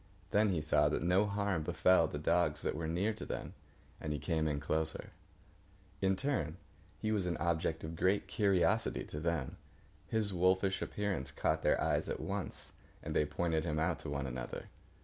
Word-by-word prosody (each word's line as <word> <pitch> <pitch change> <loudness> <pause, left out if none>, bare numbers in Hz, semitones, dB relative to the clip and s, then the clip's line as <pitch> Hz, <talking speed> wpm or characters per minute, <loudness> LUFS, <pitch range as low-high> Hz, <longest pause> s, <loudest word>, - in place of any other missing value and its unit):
Then 105 +1 +4
he 90 -5 0
saw 75 -1 +3
that 75 - -1
no 95 +4 +3
harm 100 -4 0
befell 85 +2 +4
the - - -5
dogs 80 0 +1
that - - 0
were 80 +1 -3
near 95 +7 +1
to 110 - -8
them, - - -5 0.5
and 75 - -3
he 75 - -1
came 80 0 0
in 75 -2 0
closer. 80 +2 -1 0.9
In 95 0 +3
turn 95 - -1 0.4
he 110 - -1
was 100 -4 +1
an 85 - -1
object 80 0 0
of 80 +1 -5
great 95 +4 +2
curiosity 100 +2 +2
to 75 - -6
them. 80 -4 -2 0.5
His 110 -3 0
wolfish 95 +2 +2
appearance 100 -10 -2
caught 70 - 0
their - - +3
eyes - - +1
at - - -2
once, - - -3 0.3
and - - -4
they 75 - +3
pointed 80 +1 0
him 75 -3 -1
out 85 +2 +1
to 75 - -6
one 70 -1 -2
another. 65 -2 -5
85 Hz, 185 wpm, -34 LUFS, 75-95 Hz, 0.9 s, Then